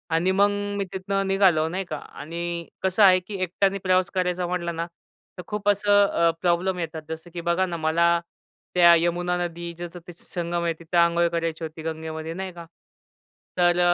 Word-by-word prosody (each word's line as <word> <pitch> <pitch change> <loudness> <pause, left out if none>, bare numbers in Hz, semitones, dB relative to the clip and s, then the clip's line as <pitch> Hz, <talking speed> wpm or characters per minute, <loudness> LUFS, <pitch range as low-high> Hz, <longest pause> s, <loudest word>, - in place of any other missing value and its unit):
आणि 175 +3 +2
मग 200 +2 +4 0.3
मी 200 - 0
तिथनं 195 +1 -1
निघालो, 190 -5 +3
नाही 185 +2 -3
का 155 - -5
आणि 170 +4 -6 0.2
कसं 190 +2 +3
आहे 185 -1 +7
की 195 +3 -8
एकट्याने 195 +2 +1
प्रवास 185 -1 +2
करायचा 180 -1 0
म्हटला 175 -1 -2
ना, 165 0 -3 0.5
तर 180 - -6
खूप 210 -1 -1
असं 205 0 +4
अ, 170 -3 +2
प्रॉब्लेम 180 +1 +1
येतात. 160 -1 -4
जसं 160 +2 -7
की 175 - -4
बघा 170 +2 +1
ना, 175 -2 -4
मला 170 +2 +3 0.6
त्या 175 -1 +8
यमुना 175 +1 0
नदी, 170 0 -6
जसं 175 0 -7 0.2
संगम 175 -1 -3
आहे 170 -1 +1
तिथं, 170 +1 -3
अंघोळ 170 0 +2
करायची 165 -1 -2
होती 160 0 -6
गंगेमध्ये, 160 0 -5
नाही 190 +1 -5
का? 170 -1 -10 0.9
तर 175 0 +3
175 Hz, 175 wpm, -24 LUFS, 170-185 Hz, 0.9 s, त्या